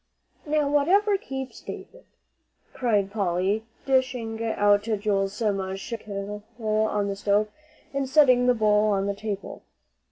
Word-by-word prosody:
"Now, 300 Hz, -1 st, +1 dB
whatever 370 Hz, +9 st, +3 dB
keeps 265 Hz, -8 st, -6 dB
David!" -, -, -10 dB, 0.7 s
cried 210 Hz, -6 st, +1 dB
Polly, 200 Hz, +1 st, 0 dB, 0.2 s
dishing 250 Hz, -4 st, 0 dB
out 205 Hz, -2 st, +3 dB
Joel's 205 Hz, -2 st, -1 dB
mush 195 Hz, -3 st, -2 dB
from 230 Hz, -, -3 dB
the -, -, -20 dB
kettle 205 Hz, 0 st, -6 dB, 0.2 s
on 215 Hz, -2 st, 0 dB
the 200 Hz, -, -2 dB
stove, 205 Hz, +1 st, +1 dB, 0.4 s
and 275 Hz, -1 st, -1 dB
setting 255 Hz, -4 st, +5 dB
the 250 Hz, -, +4 dB
bowl 210 Hz, -1 st, +3 dB
on 195 Hz, -1 st, +1 dB
the 200 Hz, -, -1 dB
table. 200 Hz, -1 st, -6 dB
215 Hz, 135 wpm, -25 LUFS, 200-255 Hz, 0.7 s, setting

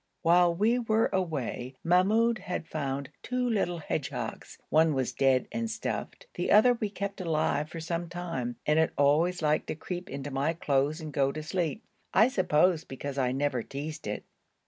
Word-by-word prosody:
While 175 Hz, 0 st, +5 dB
we 225 Hz, +7 st, +2 dB
were 225 Hz, -1 st, +1 dB
away 140 Hz, -8 st, -2 dB
Mahmoud 215 Hz, +6 st, +3 dB
had 180 Hz, -3 st, -4 dB
found 140 Hz, -3 st, -3 dB
two 250 Hz, 0 st, -1 dB
little 195 Hz, -7 st, 0 dB
hedgehogs. 145 Hz, -4 st, -4 dB
One 155 Hz, -1 st, +4 dB
was 130 Hz, -2 st, -1 dB
dead 135 Hz, -2 st, +2 dB
and 225 Hz, +1 st, -2 dB
stuffed; -, -, -4 dB
the -, -, -2 dB
other 230 Hz, +4 st, +7 dB
we 225 Hz, -3 st, -2 dB
kept 200 Hz, -1 st, -5 dB
alive 155 Hz, -2 st, 0 dB
for 165 Hz, -, -7 dB
some 170 Hz, +1 st, -3 dB
time 165 Hz, -9 st, -4 dB
and 150 Hz, +1 st, +3 dB
it 160 Hz, -, +2 dB
always 160 Hz, +5 st, +3 dB
liked 150 Hz, 0 st, +1 dB
to -, -, -3 dB
creep 180 Hz, +4 st, -6 dB
into 140 Hz, +1 st, -5 dB
my 140 Hz, +4 st, 0 dB
clothes 150 Hz, -2 st, 0 dB
and 155 Hz, -2 st, -7 dB
go 135 Hz, -1 st, +2 dB
to 155 Hz, +2 st, -6 dB
sleep 175 Hz, +5 st, -2 dB, 0.3 s
I 225 Hz, -, +6 dB
suppose 180 Hz, -5 st, +2 dB
because 140 Hz, +1 st, -5 dB
I 125 Hz, -1 st, +2 dB
never 135 Hz, -2 st, 0 dB
teased 150 Hz, +2 st, -6 dB
it. 105 Hz, -, -4 dB
160 Hz, 175 wpm, -29 LUFS, 140-185 Hz, 0.3 s, other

